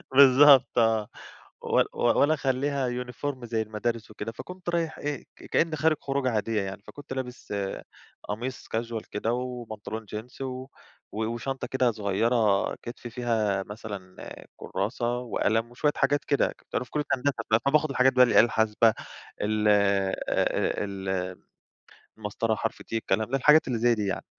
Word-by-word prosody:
بالضبط 135 -1 +7
آه. 110 -2 +3 0.5
ول - - +2
ول 120 - +2
ولا 145 +2 +4
أخلّيها 135 -2 0 0.2
uniform 125 +1 -5
زي 115 -1 -1
المدارس 110 +1 -3
وكده. 110 +1 -5
فكنت 180 +7 -8
رايح 170 -2 -1
إيه، 145 -2 -3
ك - - -16
كأن 165 -1 +1
خارج 155 0 +2
خروجة 135 -1 0
عادية 110 0 0
يعني، 100 +1 -5
فكنت 145 -2 -9
لابس 125 -5 -6 0.7
قميص 120 +5 -5
casual 115 -1 -3
كده، 110 +3 -1
وبنطلون 115 -3 -5
jeans، 120 +5 -8
و 130 0 -5 0.5
و 110 +1 -1
وشنطة 120 +4 -3
كده 130 -2 +2
صغيرة 105 0 +1
كِتف، 120 0 -9
فيها 110 -5 0
مثلًا 100 -3 -8 0.3
كراسة 120 +4 -2
وقلم 115 -1 0
وشوية 145 +4 +1
حاجات 145 +1 +2
كده. 140 - +3
كنت - - -12
أنا - - +1
في 125 - -18
كُلِّية 150 - 0
هندسة، 140 +2 0 0.3
فباخد 150 +2 +3
الحاجات 130 -1 +3
بقى، 125 0 +7
الآلة 120 - +5
الحاسبة، 110 0 +3 0.5
ال 105 0 +1
ال 95 -1 0 0.8
المسطرة 110 +1 -1
حرف - - -3
T، - - -29
الكلام 110 0 0
ده، 135 - +2
الحاجات 150 +3 +5
اللي 120 -3 -1
زي 120 +1 +4
دي 105 -2 -2
يعني. 95 - -3
120 Hz, 150 wpm, -27 LUFS, 110-130 Hz, 0.8 s, بالضبط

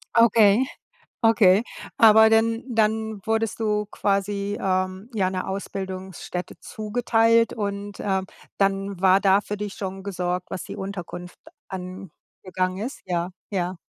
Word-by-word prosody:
Okay. 230 0 +5 0.6
Okay. 220 -3 +5 0.3
Aber 220 0 +7
denn 225 +1 +2
dann 220 -1 +1
wurdest 225 0 0
du 210 -1 0
quasi, 200 0 -1
ähm, 185 +2 -1
ja 195 -4 +1
'ne 185 -1 -4
Ausbildungsstätte 190 -2 -5
zugeteilt 230 +1 +2
und, 200 -1 -4
ähm, 190 -1 -1 0.3
dann 195 -1 0
war 190 0 +6
da 195 +1 +4
für 210 0 -5
dich 205 -1 -5
schon 195 -1 -6
gesorgt, 180 -2 -3
was - - -4
die - - -8
Unterkunft 180 -2 -7 0.3
angegangen 185 0 -5
ist? 235 +8 -5
Ja, 175 -1 -1 0.2
ja. 185 -2 -2
200 Hz, 125 wpm, -24 LUFS, 185-220 Hz, 0.6 s, Aber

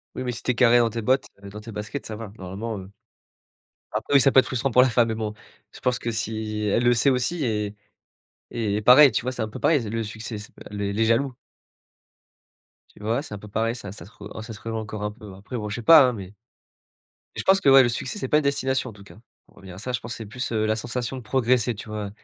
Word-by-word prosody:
Oui, - - -4
mais 125 - -2
si 110 - -7
tu 125 - +1
es - - -3
carré 120 0 +5
dans 120 -1 +3
tes 115 +1 -4
bottes, 130 +5 +2 0.2
heu, 100 - -8
dans 105 +1 -9
tes 110 0 -10
baskets, 105 +7 -5
ça 110 - -6
va 110 -2 -8
normalement, 100 +4 -5
heu, 95 +1 -10 1.0
après 110 +6 -2
oui, 140 - +8
ça 135 - +5
peut 130 - +4
être - - +6
frustrant 130 +1 -1
pour 125 - +5
la 130 - +4
femme, 115 -1 +3
mais 110 - -2
bon, 105 -1 -3 0.4
je - - -13
pense 125 -1 +1
que 115 - -3
si 110 -1 -3
elle 120 - +2
le 120 0 +5
sait 135 +4 +3
aussi 135 +5 0
et 105 -2 -2 0.8
et 105 -2 -2
pareil, 130 +5 +8
tu - - 0
vois, 130 +2 -3
c'est 120 - -5
un - - -3
peu - - -8
pareil, 150 -5 +3
le 115 +1 -2
succès, 110 +1 -6
c 105 - -10 0.2
heu, - - -7
le 100 0 -2
les 110 +2 +1
jaloux. 120 +4 +1 1.6
Tu - - -14
vois, 115 +5 0
c'est 145 - -9
un 105 - -5
peu 105 +1 -12
pareil, 115 +3 -1
ça 100 -5 -8
ça 90 -5 -11
se 100 - -16
rej 105 -2 -11
un 110 - -7
ça 110 0 -8
se 105 - -11
rejoint 115 0 -4
encore 105 -1 -6
un 105 - -2
peu 105 0 -13
ouais. 95 - -11
Après, 105 +5 -7
bon, 105 -1 -4
je 105 - -4
sais 120 - -5
pas, 155 +6 +8
hein, 125 - 0
mais 100 -4 -7
mais 95 - -16 1.1
je - - -2
pense 195 0 +4
que 135 - +5
ouais, 135 0 +9
le 120 - +2
succès, 120 +2 -3
c'est 130 - -4
pas - - +3
une - - 0
destination 135 -3 0
en - - -13
tout 100 -1 -15
cas. 100 -1 -15 0.3
Pour - - -26
revenir 95 -2 -11
à - - -10
ça, 125 +4 -5
je 120 - -1
pense 115 +1 -7
que - - -5
c'est 110 - -7
plus, 125 +4 -5
heu, 110 -1 +1
la 110 0 +1
sensation 120 +2 -4
de 125 - -7
progresser, 125 0 +1
tu 105 +1 -10
vois? 105 -2 -4
115 Hz, 290 wpm, -24 LUFS, 105-125 Hz, 1.6 s, ouais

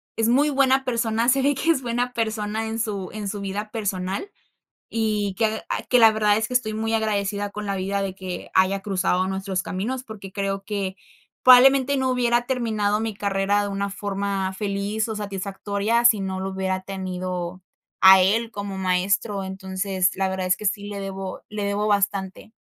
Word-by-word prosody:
es 225 0 +1
muy 280 +6 +4
buena 270 -1 +3
persona, 230 -1 +1
se 270 +1 +3
ve 285 +1 +3
que 285 +5 -2
es 305 - 0
buena 245 +1 -1
persona 220 -1 -2
en 225 +1 -3
su 205 -4 -3
en 210 -1 -5
su 205 0 -4
vida 200 +2 -4
personal, 195 - -3 0.6
y 210 -3 -1
que 220 -1 0
ah - - -2
que 250 - +5
la 225 -1 +7
verdad 210 -1 +3
es 220 - 0
que 250 - -5
estoy 235 -3 +1
muy 225 +1 -1
agradecida 205 -2 -1
con 210 +1 -6
la 200 -1 -1
vida 195 +1 -1
de 195 -1 -3
que 185 -1 -7
haya 190 +1 +3
cruzado 185 -1 0
nuestros 190 -1 -2
caminos 245 +8 -3
porque 200 -5 -10
creo 195 0 -2
que 195 -2 -3 0.5
probablemente 265 +2 +7
no 260 -1 +1
hubiera 240 -1 +1
terminado 220 -5 0
mi 220 -1 -2
carrera 200 0 +1
de 205 - -2
una 200 0 -2
forma 195 -1 -2
feliz 205 +2 -2
o 220 - -3
satisfactoria 200 +3 -2
si 230 -4 +6
no 190 -1 -3
lo 190 0 -3
hubiera 190 0 -2
tenido 185 -2 -4 0.4
a 190 0 +9
él 225 +5 +2
como 200 -2 -5
maestro, 195 +2 0
entonces 190 -1 -1
la 190 0 0
verdad 190 -1 -2
es 185 - +3
que - - -10
sí 205 0 -1
le 200 -1 -5
debo 195 -1 -6
le 210 -1 -3
debo 200 +1 0
bastante. 200 0 -1
205 Hz, 190 wpm, -23 LUFS, 195-225 Hz, 0.6 s, a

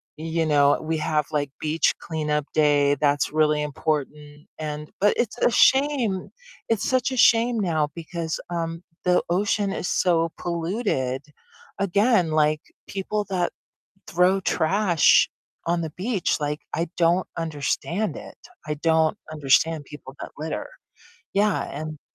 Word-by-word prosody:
you 165 +1 -2
know, 145 -2 +4
we 160 +1 -2
have, 155 -1 0
like, 145 -2 -1
beach 155 +1 +1
cleanup 150 -2 -2
day, 145 -2 +3
that's 145 0 +1
really 150 -1 +3
important 150 0 -3
and 150 -1 -5
but, 205 +1 +5
it's 240 -1 -1
a - - +4
shame. 265 -9 +3 0.4
It's 225 -3 0
such 255 +1 +1
a 260 - -3
shame 235 0 +4
now 160 -6 0
because, 165 -1 -4
um, 165 0 -3 0.2
the 180 0 +3
ocean 200 +2 +1
is 180 - -3
so 165 -2 +2
polluted. 170 - -2 0.6
Again, 200 -2 +2
like, 155 0 +2 0.3
people 205 +2 -3
that 180 -2 0 0.6
throw 180 +2 +3
trash 180 -1 +3 0.4
on 170 0 +1
the 160 - -3
beach, 195 +2 -1
like, 150 0 -2
I 165 +1 -1
don't 175 +2 +3
understand 165 +5 -2
it, - - -11 0.3
I 150 - -1
don't 160 +3 +2
understand 150 +1 +2
people 135 -1 -11
that - - -7
litter. 155 +2 -4 0.7
Yeah, 205 0 +2
and 155 +1 -6
165 Hz, 135 wpm, -24 LUFS, 150-190 Hz, 0.7 s, but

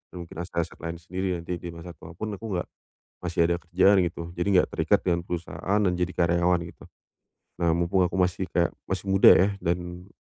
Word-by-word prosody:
mungkin 85 -2 -9
aset-aset 85 -2 -4
lain 85 0 -5
sendiri. 90 +2 -3
Nanti 85 +1 -5
di 85 - -7
masa 85 +1 -9
tua 85 +1 -13
pun 110 +5 -4
aku 105 +3 -6
nggak 90 - -2 0.5
masih 85 -1 0
ada 85 - 0
kerjaan 95 +4 +4
gitu. 85 -1 -2
Jadi 85 +2 -3
enggak 90 - +4
terikat - - +1
dengan 85 -1 0
perusahaan 90 +4 -2
dan 90 - +3
jadi 90 0 0
karyawan 85 0 +2
gitu. - - -16 0.7
Nah, 85 -2 +2
mumpung 85 +2 +2
aku 90 - -7
masih 90 0 0
kayak 85 -2 +1 0.2
masih 95 +1 -3
muda 95 0 +6
ya 95 +3 +4
dan 90 +1 -3
90 Hz, 195 wpm, -26 LUFS, 85-90 Hz, 0.7 s, muda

